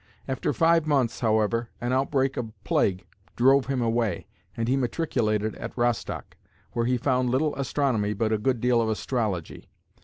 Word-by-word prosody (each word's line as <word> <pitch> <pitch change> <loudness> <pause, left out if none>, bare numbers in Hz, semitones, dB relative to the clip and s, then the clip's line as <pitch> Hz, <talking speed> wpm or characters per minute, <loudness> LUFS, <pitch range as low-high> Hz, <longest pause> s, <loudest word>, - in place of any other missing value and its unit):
After 130 - -1
five 165 -1 +3
months, 135 -6 +1
however, 110 +1 +1
an 120 +1 -1
outbreak 135 0 +1
of 115 -3 -4
plague 95 -1 +1 0.3
drove 135 +2 +4
him 135 -3 0
away, 115 -5 0 0.3
and 115 0 -1
he 130 - +2
matriculated 115 -6 0
at 115 - -7
Rostock, 120 -1 -2 0.3
where 115 0 -1
he 125 0 +2
found 125 0 +1
little 145 +4 +1
astronomy 130 -6 0
but 110 +2 -1
a 110 - +1
good 125 +2 0
deal 120 0 +3
of 110 - 0
astrology. 110 -6 -3
120 Hz, 160 wpm, -26 LUFS, 110-135 Hz, 0.3 s, drove